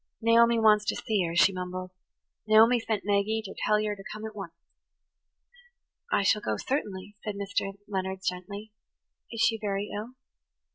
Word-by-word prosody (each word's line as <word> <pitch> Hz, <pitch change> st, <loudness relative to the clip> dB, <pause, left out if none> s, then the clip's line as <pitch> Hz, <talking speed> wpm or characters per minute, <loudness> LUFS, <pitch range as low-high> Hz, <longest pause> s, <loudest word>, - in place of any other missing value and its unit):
"Naomi 235 Hz, +1 st, +5 dB
wants 215 Hz, -2 st, +5 dB
ter -, -, -1 dB
see 215 Hz, -2 st, -1 dB
yer," 165 Hz, 0 st, -3 dB
she 195 Hz, +3 st, +5 dB
mumbled. 185 Hz, 0 st, -5 dB, 0.6 s
"Naomi 225 Hz, +3 st, +6 dB
sent 220 Hz, -3 st, -2 dB
Maggie 205 Hz, +2 st, +1 dB
ter 195 Hz, -, -7 dB
tell 210 Hz, 0 st, +3 dB
yer 210 Hz, -1 st, -1 dB
ter 195 Hz, -, -11 dB
come 215 Hz, +1 st, -6 dB
at 220 Hz, -1 st, -7 dB
onct." 180 Hz, -5 st, -7 dB, 1.6 s
"I -, -, +3 dB
shall 210 Hz, +2 st, +3 dB
go, 110 Hz, -, -2 dB
certainly," 205 Hz, -, -3 dB
said 210 Hz, -2 st, -4 dB
Mr. 195 Hz, 0 st, -2 dB
Leonard 190 Hz, -1 st, -3 dB
gently. 200 Hz, +4 st, -4 dB, 0.6 s
"Is 230 Hz, -1 st, -3 dB
she 225 Hz, 0 st, +3 dB
very 200 Hz, 0 st, -2 dB
ill?" 225 Hz, +5 st, -6 dB
205 Hz, 160 wpm, -28 LUFS, 190-220 Hz, 1.6 s, Naomi